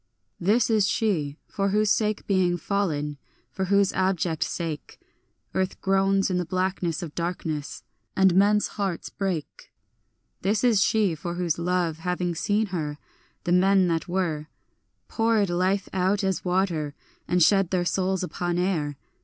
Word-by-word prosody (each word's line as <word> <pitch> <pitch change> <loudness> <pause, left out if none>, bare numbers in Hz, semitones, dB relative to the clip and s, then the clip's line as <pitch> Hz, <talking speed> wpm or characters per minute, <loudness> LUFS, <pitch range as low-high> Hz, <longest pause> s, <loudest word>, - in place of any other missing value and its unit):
This 210 +6 +3
is 210 -3 +3
she 155 -12 0
for 195 -1 -1
whose 210 +1 +2
sake 215 -1 0
being 185 -3 +2
fallen, 150 -6 -2 0.3
for 190 - -2
whose 200 0 +3
abject 185 -4 0
sake, 165 -4 -4 0.5
Earth 190 0 -1
groans 195 0 +2
in 180 - +1
the - - 0
blackness 185 -2 -1
of 155 -3 -7
darkness, 165 -4 -4 0.3
and 190 -1 +4
men's 205 +3 +4
hearts 195 -5 -3
break. 185 -6 -4 0.7
This 205 +5 +1
is 230 -5 +4
she 205 -2 +3
for 170 +2 -5
whose 175 -2 -1
love, 170 -2 0
having 180 0 -1
seen 205 +6 +1
her, 150 -4 -3 0.5
the 175 - -1
men 190 +1 +4
that 165 +1 -1
were 170 -5 -1 0.6
Poured 225 -4 +1
life 185 +2 +1
out 190 +2 +1
as 190 -3 -1
water, 180 -5 0 0.3
and 180 -1 +3
shed 195 0 +4
their 180 -2 0
souls 190 +1 0
upon 175 -1 -2
air. 160 -6 -1
185 Hz, 145 wpm, -25 LUFS, 170-195 Hz, 0.7 s, and